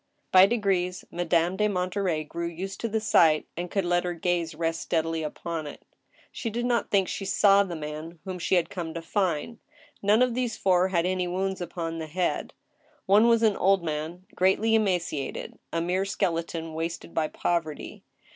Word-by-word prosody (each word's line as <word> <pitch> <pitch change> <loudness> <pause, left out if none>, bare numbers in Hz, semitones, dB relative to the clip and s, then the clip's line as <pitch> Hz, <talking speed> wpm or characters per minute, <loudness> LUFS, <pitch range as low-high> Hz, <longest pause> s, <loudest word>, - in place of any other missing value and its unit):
By 185 +1 +8
degrees 195 -5 0
Madame 175 +1 +1
de 210 - +3
Monterey 180 -4 -1
grew 170 +3 -4
used 185 +4 -6
to 230 - 0
the 220 0 0
sight, 165 -8 +4
and 175 +1 -4
could 195 -1 -1
let 175 0 +2
her 175 -1 -3
gaze 170 -1 -1
rest 165 0 -1
steadfly 165 -1 -1
upon 160 +1 -4
it. 145 - -10 0.5
She 230 - -4
did 240 +2 -2
not 240 -2 +1
think 195 -2 +2
she - - -4
saw 195 +1 +5
the 180 -3 -5
man 155 +2 -6
whom 185 -1 -5
she 180 - +1
had 175 - +1
come 170 -4 -5
to 165 - -3
find. 190 +4 -1 0.4
None 210 +4 +4
of 250 -2 +1
these 245 -2 -2
four 185 -1 +3
had 175 -3 +1
any 185 -1 0
wounds 190 +1 -2
upon 165 -2 -4
the 160 - -5
head. 175 +3 -2 0.5
One 210 +4 +5
was 230 -1 +4
an 215 -3 +4
old 195 -1 +3
man 160 +3 -4
greatly 190 +4 +2
emaciated, 180 -9 -1
a 165 - -1
mere 180 +3 0
skeleton, 165 -3 -2
wasted 165 +1 -4
by 160 -1 +1
poverty. 160 -2 -3
180 Hz, 185 wpm, -27 LUFS, 165-195 Hz, 0.5 s, By